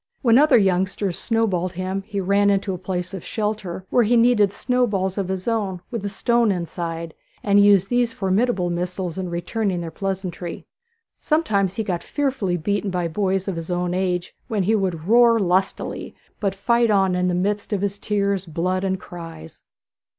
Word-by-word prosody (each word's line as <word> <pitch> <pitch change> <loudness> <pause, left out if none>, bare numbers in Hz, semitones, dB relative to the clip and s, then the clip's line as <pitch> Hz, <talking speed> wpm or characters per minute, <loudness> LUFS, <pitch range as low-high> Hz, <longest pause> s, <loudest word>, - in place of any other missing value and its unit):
When 235 0 +6
other 300 -3 +6
youngsters 190 -1 0
snowballed 195 -6 0
him 185 +2 -3
he 205 -2 -3
ran 200 +2 +3
into 195 -1 +1
a 180 - -5
place 180 0 -4
of 190 - -6
shelter, 210 -4 -3
where 245 - +4
he 235 +2 +3
kneaded 230 -4 +4
snowballs 200 -5 0
of 195 -3 -2
his 190 +1 -4
own, 205 -6 -1
with 230 -5 -4
a 205 - -2
stone 235 +2 +2
inside, 170 -2 -4 0.3
and 200 0 +5
used 200 -2 +5
these 245 -1 +2
formidable 195 -2 0
missiles 180 0 -3
in 185 -1 -3
returning 185 +2 -2
their 165 -1 -5
pleasantry. 185 -3 -4 0.5
Sometimes 205 - +1
he 225 - -1
got 180 -4 -2
fearfully 265 - -1
beaten 200 +4 -1
by 180 -2 -1
boys 190 +2 -1
his 165 -4 -4
own 180 0 -1
age, 180 -1 -1
when 210 -4 0
he 210 +5 +2
would 185 -6 -1
roar 235 +1 +6
most 205 - +1
lustily, 190 +2 -1 0.2
but 195 -2 -1
fight 235 +4 +2
on 195 -3 +3
in 180 0 +1
the 180 - +1
midst 205 +4 -1
of 200 -2 0
his 200 0 -2
tears, 200 -3 -1
blood, 180 +4 -1
and 190 -1 -1
cries. 165 - -10
195 Hz, 180 wpm, -22 LUFS, 180-210 Hz, 0.5 s, When